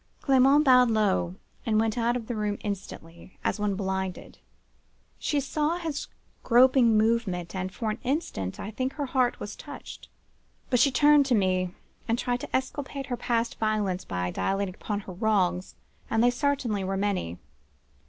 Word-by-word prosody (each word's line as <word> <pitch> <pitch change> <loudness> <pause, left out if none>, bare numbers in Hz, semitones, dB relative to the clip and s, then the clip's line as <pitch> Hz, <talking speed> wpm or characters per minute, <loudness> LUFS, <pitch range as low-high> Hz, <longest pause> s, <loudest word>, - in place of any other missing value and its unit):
"Clement 275 +2 +5
bowed 250 -2 +6
low, 95 - +1 0.3
and 215 -2 +2
went 220 -1 +1
out 240 0 +1
of 235 - -7
the 240 - -4
room 210 -1 -1
instantly, 185 -4 -7
as - - -1
one 205 -1 0
blinded. 190 -1 -4 0.8
She 295 - 0
saw 300 +4 -1
his 320 -5 -4 0.3
groping 245 -2 +5
movement, 215 -6 0
and, 185 0 -3
for 220 +2 -2
an 215 - -5
instant, 250 - -2
I 205 - -5
think 255 +4 -2
her 290 - -3
heart 255 -2 +1
was 205 - -6
touched. - - -10 0.6
But 250 - +4
she 260 - +5
turned 290 +1 +5
to 250 - +3
me, 185 -2 +1 0.3
and 230 0 +1
tried 245 0 -1
to - - -4
exculpate 270 +1 -3
her - - -2
past 235 -1 -1
violence 210 -4 0
by 90 0 -3
dilating 195 - -1
upon 205 +2 -4
her 190 - -9
wrongs, 185 -2 0 0.3
and 225 +1 +2
they 245 - +5
certainly 245 -6 0
were 195 +1 -2
many. 190 - -1
220 Hz, 165 wpm, -27 LUFS, 190-255 Hz, 0.8 s, bowed